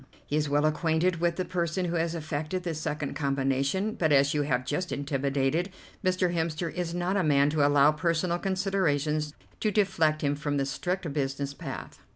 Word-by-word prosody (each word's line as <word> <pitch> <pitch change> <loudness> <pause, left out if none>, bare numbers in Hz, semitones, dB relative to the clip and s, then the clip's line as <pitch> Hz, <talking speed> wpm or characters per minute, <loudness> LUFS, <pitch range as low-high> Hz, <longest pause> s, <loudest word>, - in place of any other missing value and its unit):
He 145 - -2
is 150 -1 +1
well 145 +1 +2
acquainted 160 +3 +1
with 170 0 +1
the 185 - -2
person 180 0 -1
who 175 0 -2
has 165 0 0
effected 155 +3 -3
the 170 -2 -2
second 150 -2 -3
combination, 140 +8 0
but, 160 -6 +1
as 140 0 +4
you 150 - +1
have 130 -3 0
just 180 +7 -2
intimated, 140 +4 0 0.3
Mr. 185 -1 +1
Hemster 165 0 -1
is 175 -1 -3
not 180 +3 0
a 190 - +2
man 145 -2 +4
to 150 -1 +2
allow 145 0 +5
personal 170 +3 0
considerations 155 -6 0 0.2
to 215 - +1
deflect 165 -7 +2
him 145 0 +1
from 145 0 -2
the 135 - +1
strict 175 +3 -3
business 140 -1 -2
path. - - -7
155 Hz, 185 wpm, -28 LUFS, 145-175 Hz, 0.3 s, allow